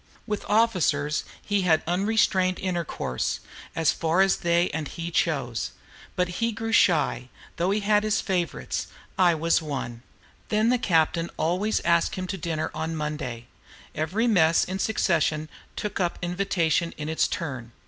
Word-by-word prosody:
With 210 -3 -3
officers 175 -10 +2 0.2
he 205 -1 +1
had 165 -4 +3
unrestrained 185 0 +2
intercourse, 170 - -2 0.4
as 165 -1 +3
far 165 +3 +1
as 195 0 +4
they 170 +1 +2
and 155 -1 -3
he 170 +3 -6
chose. 135 -9 -1 0.4
But 180 0 +1
he 230 0 +1
grew 225 0 -4
shy, 155 - +3 0.3
though 175 +2 +1
he 205 +2 +1
had 210 +1 +2
favorites: 180 - -1 0.3
I 175 -3 +4
was 165 +2 +2
one. 130 -6 -5 0.5
Then 215 +2 +2
the 250 0 +3
captain 165 -4 +2
always 180 +7 0
asked 170 +5 +2
him 185 -2 -3
to - - -4
dinner 160 -2 -2
on 160 +1 -3
Monday. 150 -6 -4 0.5
Every 175 +10 0
mess 170 -8 +4
in 190 +1 -4
succession 160 -7 +1 0.3
took 210 -1 -3
up 175 -2 -1
the - - -3
invitation 175 -3 0
in 150 - -5
its 160 0 +1
turn. 130 -8 -5
170 Hz, 150 wpm, -26 LUFS, 155-195 Hz, 0.5 s, as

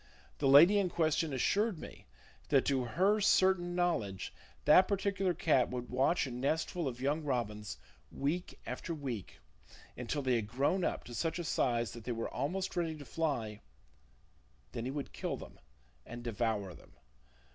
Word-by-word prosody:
The 140 - +2
lady 165 +10 +8
in 190 -2 +1
question 160 -2 +1
assured 200 - +1
me - - -11 0.4
that 135 - +4
to 130 -3 +1
her 195 - +2
certain 185 -3 +3
knowledge 115 - -1 0.3
that 185 +5 +7
particular 195 -2 0
cat 135 -6 +3
would 125 -1 -5
watch 145 +5 +2
a 130 - -6
nestful 155 +6 -1
of 125 -2 -5
young 145 +4 0
robins 105 - -2 0.3
week 165 +6 -3
after 170 - -4
week 130 -9 -5 0.6
until 125 +4 -3
they 130 -2 +2
had 110 -3 -3
grown 140 - +1
up - - -1
to 120 - -10
such 165 +6 -1
a 175 - -3
size 120 -8 0
that 115 - -9
they 120 - -2
were 115 0 -4
almost 185 +9 -2
ready 165 -3 -1
to 145 - -10
fly; 125 -11 -2 1.1
then 115 - -4
he 130 - -2
would 140 0 -5
kill - - -3
them - - -12 0.4
and 120 - -9
devour 110 -4 -1
them. - - -17
140 Hz, 165 wpm, -33 LUFS, 120-175 Hz, 1.1 s, lady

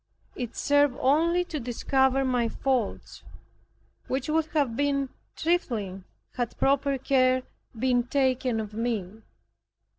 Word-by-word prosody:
It 245 -2 -5
served 285 -2 +3
only 330 +6 +3
to 315 -4 -4
discover 265 +2 +1
my 245 -3 +1
faults, 255 -3 -2 0.9
which 265 +3 -2
would 320 0 +1
have 285 -7 0
been 275 0 0 0.3
trifling 220 - -1 0.3
had 240 -2 -2
proper 275 0 +2
care 255 -1 +2 0.3
been 245 0 +1
taken 255 -3 +1
of 215 -1 -5
me. 220 -3 -3
260 Hz, 115 wpm, -27 LUFS, 240-280 Hz, 0.9 s, served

